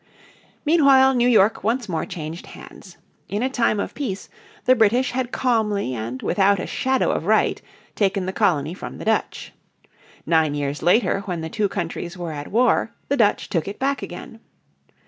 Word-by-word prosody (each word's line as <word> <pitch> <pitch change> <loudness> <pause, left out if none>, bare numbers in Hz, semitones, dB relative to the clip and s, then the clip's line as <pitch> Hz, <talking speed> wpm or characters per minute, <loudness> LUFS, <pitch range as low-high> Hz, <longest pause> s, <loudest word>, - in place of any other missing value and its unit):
Meanwhile 275 -4 +5
New 245 -1 +2
York 215 -4 +3
once 230 +2 0
more 165 -4 -3
changed 160 +1 -7
hands. 185 - -13 0.3
In 205 +4 -2
a 260 - -1
time 230 -5 +1
of - - -3
peace 205 -10 -5 0.4
the 255 - +6
British 235 +3 +2
had 250 -1 -2
calmly 210 - 0
and 120 +2 -5
without 200 -1 +2
a - - -3
shadow 265 0 0
of - - -3
right - - +2 0.3
taken 195 -2 0
the 190 - -3
colony 165 -8 +1
from 185 - -8
the - - -8
Dutch. 220 0 -1 0.7
Nine 160 -3 +2
years 145 0 -3
later 185 +3 +3
when 175 -4 -3
the 160 - -5
two 205 +3 -1
countries 175 -1 -5
were 175 -2 -5
at 145 -1 -6
war 235 +1 +2
the 280 - +1
Dutch 215 -4 +2
took 165 -2 -2
it 200 - -6
back 275 +1 -1
again. - - -9
200 Hz, 175 wpm, -22 LUFS, 170-245 Hz, 0.7 s, the